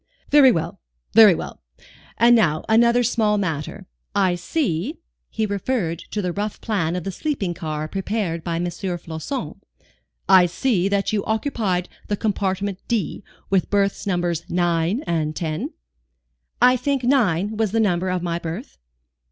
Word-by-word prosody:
"Very 285 -3 +7
well, 165 -7 -3 0.3
very 215 -5 +8
well. - - -7 0.6
And 240 +1 +6
now, 160 -9 +2
another 235 +2 +4
small 215 -3 +2
matter. 165 0 -3 0.3
I 190 -3 +3
see," 205 - -2 0.3
he 220 - -1
referred 200 -4 -2
to 210 - -3
the 180 -1 -1
rough 205 +2 -3
plan 180 -7 -1
of 180 - -3
the 195 - -3
sleeping 200 - -2
car 155 -2 -4
prepared 195 -2 -2
by 170 -1 -2
M. 170 +1 -1
Floçon, 175 - -5 0.7
"I 185 -2 +7
see 195 0 0
that 200 +1 0
you 205 -2 0
occupied 215 -6 -1 0.2
the 205 - -1
compartment 195 -2 -1
d, 225 -3 -2 0.3
with 190 -2 +2
berths 200 0 0
Nos. 175 -3 0
9 175 - 0
and 155 -2 -1
10?" 155 -2 -3 0.9
"I 250 +1 +5
think 270 +1 -1
9 215 -6 +2
was 215 -2 0
the 225 - +1
number 185 -4 +1
of 180 -1 -1
my 170 -1 -1
berth." 170 - -7
195 Hz, 150 wpm, -22 LUFS, 170-220 Hz, 0.9 s, very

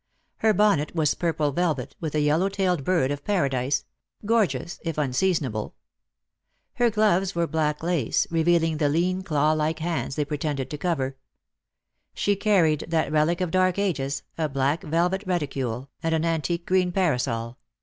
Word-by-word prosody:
Her 220 - +3
bonnet 200 -8 +2
was 155 -3 +2
purple 155 -4 0
velvet, 170 +1 -1
with 155 -2 -4
a 150 - +2
yellow 155 +6 +2
tailed 185 -6 0
bird 160 -5 +1
of 145 0 -4
paradise 140 -8 0 0.2
— - - -21
gorgeous 190 - 0
if 165 -2 -4
unseasonable. 140 - 0 1.0
Her 240 -1 +2
gloves 200 -4 +2
were 170 0 +1
black 155 -2 -1
lace, 165 -9 +1
revealing 165 -1 +2
the 150 -2 +2
lean 180 +5 +1
claw 150 -4 +1
like 155 +1 0
hands 165 -4 -2
they 150 - 0
pretended 145 -2 -3
to 150 - -4
cover. 135 -7 -1 1.0
She 205 - +1
carried 180 -7 +2
that 160 -3 0
relic 155 +3 +2
of 180 -3 -1
dark 185 0 +2
ages, 140 -9 -1 0.2
a 155 -2 0
black 140 +3 0
velvet 175 +5 0
reticule, 135 -7 -2
and 165 -1 +1
an 160 +1 0
antique 165 +1 -1
green 185 -1 +2
parasol. 125 -10 -1
160 Hz, 160 wpm, -25 LUFS, 145-180 Hz, 1.0 s, Her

